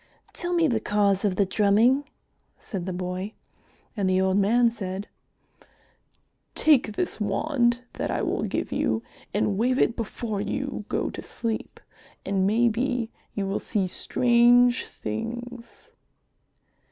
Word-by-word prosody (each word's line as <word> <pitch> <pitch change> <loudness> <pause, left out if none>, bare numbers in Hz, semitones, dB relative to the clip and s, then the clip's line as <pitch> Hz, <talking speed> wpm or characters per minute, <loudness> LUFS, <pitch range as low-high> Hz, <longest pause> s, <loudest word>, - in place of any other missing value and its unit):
"Tell 350 0 -1
me 335 -2 +3
the 235 -5 +1
cause 205 -2 +1
of 200 -3 +1
the 200 - +3
drumming," 220 +8 +3 0.5
said 190 -4 -6
the - - -1
boy. 185 +3 -4 0.6
And 200 -4 0
the 185 0 +3
old 190 0 +2
man 230 +4 +4
said, 195 -3 -5 1.5
"Take 270 -8 +4
this 345 -4 -2
wand 240 +3 +1
that - - -3
I - - -1
will - - -1
give - - -2
you - - 0 0.3
and 200 -1 0
wave 255 +3 +2
it 235 - +2
before 220 -2 -3
you - - -3
go - - -1
to - - -7
sleep, 225 -2 -4 0.5
and 190 -1 +1
maybe 235 +2 +1 0.2
you 200 - -1
will 195 +1 -1
see 205 -4 -1
strange 240 +5 +4
things." 235 - -7
220 Hz, 135 wpm, -26 LUFS, 195-240 Hz, 1.5 s, man